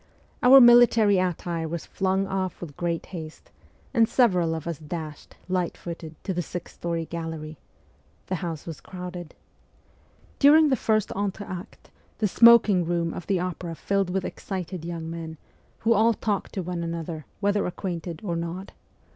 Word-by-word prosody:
Our 260 +2 +9
military 240 -5 +7
attire 175 -2 -2
was 170 0 -5
flung 190 0 0
off 190 -1 -3
with 155 -5 -8
great 170 -1 -2
haste, 160 -3 -8 0.4
and 230 -3 +4
several 180 -10 +3
of 160 - -6
us 170 -4 -4
dashed, 155 -1 -7
lightfooted, 170 -3 -4
to 190 - -2
the 175 - -1
sixth 175 +1 -7
story 170 -1 -3
gallery. 160 -2 -6 0.7
The 185 - -2
house 165 -4 -4
was 165 -2 -7
crowded. 180 -2 -8 1.0
During 300 +2 +7
the 265 - +3
first 215 -3 0
entr'acte 195 -1 -5 0.3
the 215 - +1
smoking 215 -3 +6
room 170 0 -1
of 175 - -7
the 195 -3 +1
opera 175 -1 -4
filled 195 +2 0
with 190 0 -1
excited 185 -3 -5
young 165 -1 -5
men, 165 -1 -6 0.4
who 230 +1 +4
all 225 +1 +4
talked 205 -2 -2
to 190 - -3
one 175 0 -4
another, 165 -2 -5
whether 205 0 +1
acquainted 175 -3 -5
or 175 -5 -2
not. 170 +3 -5
180 Hz, 155 wpm, -25 LUFS, 165-200 Hz, 1.0 s, Our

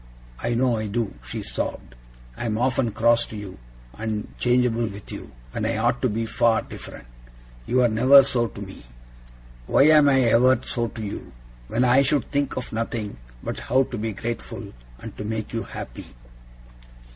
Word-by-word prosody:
I 120 +1 0
know 125 -1 +2
I 110 -1 -2
do!' 110 0 -2
she 60 - -6
sobbed. - - -4 0.4
'I'm 110 - -2
often 130 0 +1
cross 115 +2 +3
to 110 - -8
you, 100 -8 -8 0.3
and 110 - -4
changeable 120 -2 +2
with 100 -1 -9
you, - - -8 0.2
when - - -3
I 110 0 0
ought 120 +2 +1
to 130 - +2
be 115 +2 -1
far 115 0 +2
different. - - -10 0.6
You 125 0 +3
are - - +5
never 130 +5 +7
so 120 -3 +1
to 105 - -10
me. 95 -7 -11 0.8
Why - - +5
am 150 -2 +7
I 135 -1 +4
ever 125 +1 +5
so 120 -1 -1
to 110 0 -7
you, 100 - -6 0.3
when 120 +3 +1
I 125 +2 +5
should 140 +1 +1
think 140 -1 -1
of 130 - -5
nothing 110 - -3 0.3
but - - -4
how 130 +2 +2
to 125 - -6
be 110 0 -2
grateful, 115 +4 -5 0.2
and - - -9
to - - -5
make 110 +1 -4
you 115 - -1
happy! - - -8
115 Hz, 180 wpm, -24 LUFS, 110-125 Hz, 0.8 s, never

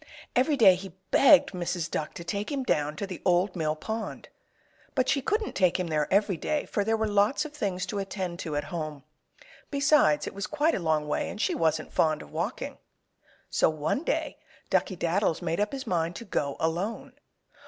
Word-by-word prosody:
Every 275 +4 +3
day 205 -7 +8
he 185 -1 -7 0.2
begged 280 +1 +6
Mrs. 175 -2 -2
Duck 150 - -3
to 170 - -6
take 200 - -3
him 275 -2 -1
down 150 -10 0
to 200 - -3
the 185 -3 -7
Old 180 +2 +2
Mill 155 -3 0
Pond. 220 +7 -5 0.7
But 260 -2 +2
she 275 - +2
couldn't 425 - -1
take 185 -1 +2
him 180 - 0
there 155 -3 -1
every 200 -2 +3
day, 295 - -1
for 205 - -1
there 225 +2 +1
were 220 - 0
lots 205 +8 +2
of 300 - -8
things 195 -9 -2
to 200 +3 -3
attend 190 -3 -4
to 155 -3 -4
at 145 - 0
home. 155 -4 -4 0.7
Besides, 280 - +3
it - - -5
was 200 +1 -4
quite 305 +2 +1
a - - 0
long 155 -3 0
way, - - -1
and - - -7
she - - +1
wasn't 160 -1 0
fond 155 -2 +2
of 75 - -15
walking. - - -4 0.7
So - - +3
one 155 - -1
day - - -2 0.3
Duckey 185 - +1
Daddles 170 0 +1
made 165 - -1
up 210 0 +1
his 275 0 -5
mind 170 -1 -1
to 235 - -7
go 140 -8 -2
alone. 200 +11 -2
185 Hz, 200 wpm, -28 LUFS, 160-225 Hz, 0.7 s, day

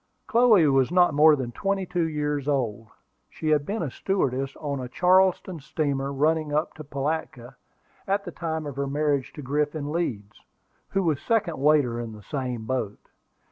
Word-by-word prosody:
Chloe 230 -7 +5
was 135 -1 +3
not 175 -2 +4
more 150 +1 +6
than 130 -4 -4
twenty 195 +5 -1
two 175 -2 -1
years 150 -2 -2
old. 115 -6 -1 0.4
She 155 - -4
had 150 -2 +2
been 215 0 -2
a 145 - -3
stewardess 135 -8 -1
on 140 -3 -4
a 125 -1 -6
Charleston 185 +2 +3
steamer, 140 -1 -2
running 155 +2 +1
up 150 +3 0
to 155 - -9
Pilatka, 135 -3 -4 0.5
at 200 +1 0
the 175 - -6
time 160 -2 -4
of 140 -2 -6
her 140 0 -1
marriage 145 -1 0
to 150 - -8
Griffin 145 +2 -1
Leeds, 115 -12 -3 0.5
who 195 0 0
was 155 -5 0
second 205 - 0
waiter 140 -5 +3
in 115 -2 -5
the 105 -1 -12
same 125 -5 -4
boat. 115 -5 -4
150 Hz, 175 wpm, -25 LUFS, 135-165 Hz, 0.5 s, more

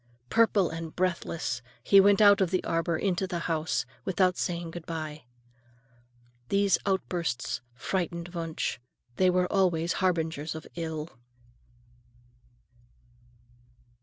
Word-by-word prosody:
Purple 215 -6 +3
and 165 -1 -6
breathless 170 -7 -1 0.2
he 195 - +7
went 200 +2 +5
out 205 -1 +7
of 185 - +3
the 185 0 0
arbor 165 0 0
and 160 - -3
into 190 +1 -1
the 180 -2 -3
house, 160 -6 -1 0.2
without 185 -1 +2
saying 170 -2 -3
good 170 -1 -9
bye. 155 -3 -5 1.2
These 200 0 +3
outbursts 175 -9 -1
frightened 170 +3 -3
Wunsch. 165 -6 -3 0.4
They 185 - +4
were 180 0 +2
always 175 -3 +2
harbingers 160 -4 0
of 160 - -7
ill. 160 -5 -5
170 Hz, 115 wpm, -28 LUFS, 160-185 Hz, 1.2 s, he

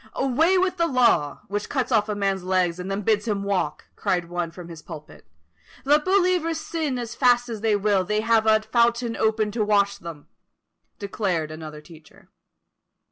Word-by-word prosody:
"Away 310 +8 +2
with 370 0 +1
the 335 0 +2
Law! 235 - +2
which 205 +2 -4
cuts 265 -2 -2
off 215 -2 +2
a 210 - -1
man's 195 -2 -1
legs 180 -2 0
and 180 +1 -5
then 195 +1 -3
bids 215 +2 +1
him 200 -2 -1
walk!" 200 -3 -2
cried 175 -2 -1
one 175 -1 -3
from 170 +1 -11
his 165 -2 -10
pulpit. 155 -1 -12 0.6
"Let 295 +2 +3
believers 360 -4 +2
sin 310 -4 -3
as 240 -2 -5
fast 245 -1 +3
as 220 -3 -5
they 220 -2 +2
will, 200 -2 +1
they 210 +3 -1
have 225 0 +2
a 215 0 +4
fountain 235 0 +1
open 220 -1 0
to 220 0 -1
wash 200 -1 +1
them;" 165 -4 -9 0.7
declared 190 -6 -2
another 155 -1 -9
teacher. 155 -1 -18
210 Hz, 180 wpm, -24 LUFS, 180-245 Hz, 0.7 s, a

